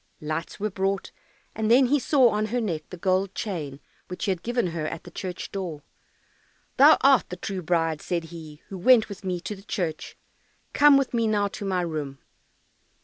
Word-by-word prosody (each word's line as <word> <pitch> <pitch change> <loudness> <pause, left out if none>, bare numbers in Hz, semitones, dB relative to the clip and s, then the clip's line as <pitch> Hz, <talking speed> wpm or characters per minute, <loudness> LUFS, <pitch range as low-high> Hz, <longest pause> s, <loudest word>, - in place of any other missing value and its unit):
Lights 155 +4 -5
were 210 +1 -2
brought, 195 +1 -2 0.4
and 220 -1 -1
then 255 +3 +6
he 285 +4 +2
saw 260 -2 +4
on 215 0 -1
her 245 +3 -1
neck 175 -9 -3
the 180 - -8
gold 185 +2 0
chain 150 -10 -4 0.3
which 180 - -5
he 200 - +1
had 180 -3 -3
given 240 0 -1
her 155 -2 -3
at 165 - -6
the 175 - -12
church 180 0 -6
door. 175 -7 -5 0.9
"Thou 295 +4 +8
art 270 -6 +4
the 180 - -5
true 190 +1 -5
bride," 165 -2 0
said 170 -2 -2
he, 155 -3 -11
"who 190 - -7
went 225 +2 +5
with 200 -1 -9
me 180 -2 -2
to 210 - -5
the 195 - -14
church; 175 -6 -4 0.6
come 290 -1 +7
with 275 -2 -1
me 230 -1 +1
now 205 -2 +1
to 200 - -7
my 185 -2 0
room." 150 -5 -4
190 Hz, 200 wpm, -25 LUFS, 170-220 Hz, 0.9 s, Thou